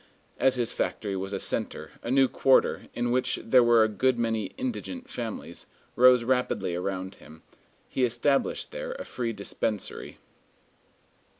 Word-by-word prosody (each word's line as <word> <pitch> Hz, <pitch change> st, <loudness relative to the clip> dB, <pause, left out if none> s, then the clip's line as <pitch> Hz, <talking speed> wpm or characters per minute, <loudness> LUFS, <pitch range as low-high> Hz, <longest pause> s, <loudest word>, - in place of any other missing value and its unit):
As 130 Hz, -, +3 dB
his 120 Hz, -2 st, -1 dB
factory 100 Hz, -2 st, -2 dB
was 95 Hz, +1 st, -4 dB
a 100 Hz, -, -2 dB
centre, -, -, -3 dB
a -, -, -6 dB
new 135 Hz, +1 st, +5 dB
quarter, 135 Hz, +1 st, +2 dB
in 120 Hz, 0 st, 0 dB
which 130 Hz, +1 st, +1 dB
there 125 Hz, +2 st, +5 dB
were 120 Hz, -1 st, +5 dB
a -, -, +3 dB
good 125 Hz, +4 st, +1 dB
many 115 Hz, -2 st, 0 dB
indigent 260 Hz, 0 st, -4 dB
families, 115 Hz, -, -6 dB, 0.3 s
rose 125 Hz, -1 st, +6 dB
rapidly 120 Hz, -7 st, 0 dB
around 95 Hz, +1 st, -3 dB
him; 80 Hz, +1 st, -15 dB, 0.4 s
he 130 Hz, -, -1 dB
established 125 Hz, +4 st, +1 dB
there -, -, -5 dB
a -, -, -7 dB
free 120 Hz, -2 st, -3 dB
dispensary. 105 Hz, 0 st, -4 dB
120 Hz, 145 wpm, -27 LUFS, 105-130 Hz, 0.4 s, rose